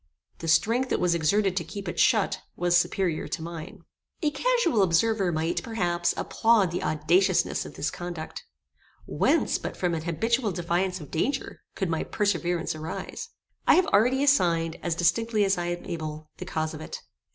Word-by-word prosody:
The 165 - -6
strength 230 +11 +2
that - - 0
was 180 -1 +2
exerted 185 +4 +2
to 180 - 0
keep 190 +4 -7
it 175 - -4
shut, 215 -5 +3
was 175 0 +1
superior 175 -1 +1
to 170 - -4
mine. 165 -1 -8 0.4
A 300 - +2
casual 355 - +2
observer 195 +2 +2
might, 160 +1 -1
perhaps, 175 -7 -1
applaud 225 -6 +2
the 175 - -2
audaciousness 170 +5 +2
of - - -12
this - - -2
conduct. 175 -2 -6 0.6
Whence, - - +1
but - - -6
from 175 -2 0
an 160 -1 -3
habitual 225 +6 0
defiance 175 +2 -1
of 150 - -11
danger, 270 - -2
could 190 -3 -2
my 160 - 0
perseverance 175 -4 -1
arise? 160 - -6 0.4
I - - +7
have 365 - +4
already 250 +6 +3
assigned, 170 - +2
as 170 -2 -1
distinctly 210 +6 +2
as 195 0 +2
I 175 0 -3
am 175 0 -4
able, 155 -2 -6
the 185 - -7
cause 160 -3 -2
of 155 - -8
it. - - -7
175 Hz, 175 wpm, -26 LUFS, 165-215 Hz, 0.6 s, I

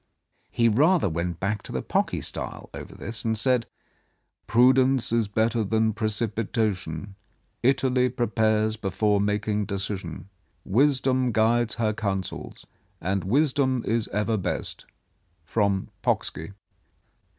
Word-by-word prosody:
He 115 - +2
rather 150 - +4
went 85 0 -3
back 100 +2 -1
to - - -9
the - - -3
Pocky - - 0
style - - -5
over - - -9
this, 115 0 -5
and 110 -1 0
said: 125 0 +2 0.4
" - - -47
Prudence 130 +1 +4
is 115 -2 +2
better 110 +2 +1
than 110 +1 +1
precipitation; 105 -4 -2 0.5
Italy 130 -1 +2
prepares 110 -2 +1
before 105 0 +1
making 105 0 0
decision. 95 -3 -4 0.4
Wisdom 130 +1 +2
guides 115 +1 +2
her 110 -2 0
counsels, 95 -3 -4 0.3
and 95 +3 -1
wisdom 130 +2 +2
is 115 0 0
ever 105 +2 0
best. 95 - -4 0.6
From 100 +1 0
Pocksky." 80 +6 -1
110 Hz, 115 wpm, -25 LUFS, 100-120 Hz, 0.6 s, rather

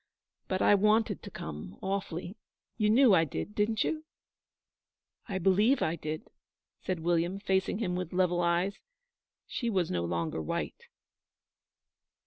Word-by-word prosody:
But 185 0 0
I - - +6
wanted 215 +2 +3
to 205 - -8
come 80 - -7
awfully. 190 -1 -3 0.4
You 210 -2 +2
knew 240 0 +6
I 165 - +6
did, 165 +6 -4
didn't 210 +1 +1
you?' 315 -1 -2 1.3
'I 195 - -1
believe 200 +8 +3
I 160 - 0
did,' 155 0 -5 0.6
said 180 -3 -2
William, 175 +2 +1
facing 190 -1 0
him 185 -5 -1
with 180 -2 -3
level 180 -1 +2
eyes. 175 +3 +1 0.7
She 235 - -2
was 185 -6 0
no 85 -1 0
longer 85 -2 -2
white. 75 - -4
185 Hz, 135 wpm, -30 LUFS, 165-210 Hz, 1.3 s, I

